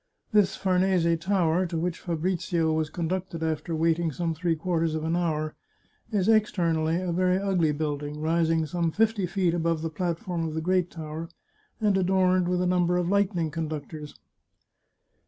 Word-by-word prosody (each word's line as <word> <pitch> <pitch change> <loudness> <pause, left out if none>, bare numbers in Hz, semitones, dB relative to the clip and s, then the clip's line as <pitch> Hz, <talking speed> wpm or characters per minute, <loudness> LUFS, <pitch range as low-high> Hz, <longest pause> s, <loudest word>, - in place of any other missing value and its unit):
This 210 -3 +4
Farnese 185 -3 +2
Tower, 180 -1 +1
to 170 - -3
which 175 +1 -2
Fabrizio 170 -1 -1
was 155 -1 0
conducted 175 0 -3
after 160 +1 -2
waiting 165 +1 +1
some 165 +3 -2
three 165 +1 0
quarters 165 -1 -1
of 155 - -3
an 165 +1 0
hour, 155 -3 -1 0.6
is 200 -3 +1
externally 170 -7 +2
a 185 -1 -2
very 185 +1 +2
ugly 190 -5 +1
building, 145 0 -3
rising 165 0 +1
some 170 +2 -1
fifty 215 +1 +1
feet 175 -1 +1
above 165 -2 0
the 165 - -2
platform 170 +1 -2
of 155 - -5
the - - 0
great 180 +1 +1
tower, 160 0 -6 0.5
and 210 -2 +2
adorned 185 -1 +2
with 180 0 +1
a - - 0
number 180 -1 +2
of 175 -1 0
lightning 185 -5 +1
conductors. 155 -1 -5
170 Hz, 160 wpm, -27 LUFS, 160-185 Hz, 0.6 s, This